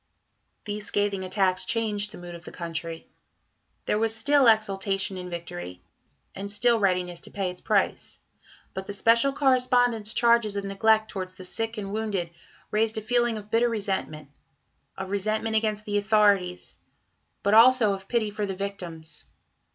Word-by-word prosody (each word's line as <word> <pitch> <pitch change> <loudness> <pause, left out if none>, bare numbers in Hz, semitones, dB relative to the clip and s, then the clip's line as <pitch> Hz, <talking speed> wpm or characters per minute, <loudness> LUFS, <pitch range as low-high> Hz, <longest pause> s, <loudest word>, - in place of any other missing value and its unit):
These 210 0 -5
scathing 205 -2 0
attacks 185 0 +1
changed 210 -3 -1
the - - -10
mood 175 0 -9
of 170 0 -10
the - - -10
country. 165 -1 -5 0.8
There 210 - +1
was 225 0 0
still 285 +1 +4
exultation 195 -3 +2
in 180 -1 -6
victory, 90 - -7 0.5
and 200 +1 -6
still 235 +3 +3
readiness 180 -3 0
to - - -9
pay 195 -3 -2
its 180 - -7
price; - - 0 0.5
but 190 0 -6
the 205 - -4
"Special 230 +6 +4
Correspondent's" 250 -5 +2
charges 235 -3 +3
of 200 - -2
neglect 220 +2 +2
towards 185 -2 -5
the 185 - -10
sick 225 +5 -3
and 200 -1 -5
wounded 205 -6 -2 0.4
raised 220 +1 +1
a - - -2
feeling 240 0 +1
of 210 0 -10
bitter 235 +1 +3
resentment 190 -9 -3 0.7
of 190 0 -6
resentment 215 +2 -1
against 215 -1 0
the 205 -1 0
authorities, 205 -4 +2 0.7
but 200 - +2
also 230 -2 +6
of 195 0 -8
pity 225 -3 0
for 205 0 -3
the 195 - -4
victims. 175 -5 -6
205 Hz, 160 wpm, -26 LUFS, 185-220 Hz, 0.8 s, also